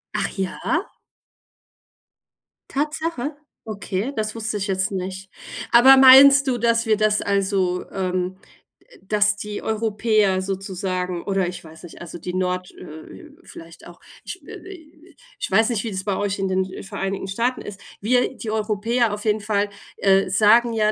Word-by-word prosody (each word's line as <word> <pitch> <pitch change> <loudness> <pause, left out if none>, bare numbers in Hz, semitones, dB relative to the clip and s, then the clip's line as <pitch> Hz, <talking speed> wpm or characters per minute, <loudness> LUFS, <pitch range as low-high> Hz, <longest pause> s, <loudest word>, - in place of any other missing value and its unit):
Ach - - -1
ja? 190 -1 -3 2.1
Tatsache? 300 -1 -3 0.3
Okay, 205 +2 -4
das 215 0 -3
wusste 220 -1 -3
ich 205 +1 -3
jetzt 190 0 -1
nicht. 190 0 -5 0.4
Aber 260 +3 +8
meinst 275 +1 +8
du, 250 -2 +1
dass 230 0 +1
wir 215 -1 +2
das 215 0 +2
also 195 -2 0
ähm, 185 -1 -2 0.6
dass 205 +1 +2
die 210 0 -6
Europäer 215 -3 +1
sozusagen 185 -2 -4
oder 195 -2 0
ich 180 - -7
weiß 160 -1 -14
nicht, 175 - -12
also 170 0 -8
die 180 - -6
Nord 180 0 -2
äh - - -11
äh, 180 - -12
vielleicht 165 +1 -13
auch, 175 - -14 0.3
ich, - - -7
äh, - - -10
äh, 325 -3 -14 0.2
ich - - -3
weiß 220 +4 +3
nicht, 225 -4 -1
wie 230 - -4
das 190 -1 -4
bei 200 -1 -1
euch 205 -1 -2
in 195 - -1
den, 190 0 -1
äh, - - -8
Vereinigten 195 -1 -4
Staaten 235 +6 -1
ist. 200 -1 -9 0.2
Wir 250 +4 +1
die 220 -3 -5
Europäer 220 +2 0
auf 205 0 -6
jeden 215 0 +1
Fall, 205 0 -1 0.3
äh, 195 -1 +3
sagen 225 +4 +4
ja, 215 -1 +2
205 Hz, 165 wpm, -22 LUFS, 190-230 Hz, 2.1 s, Aber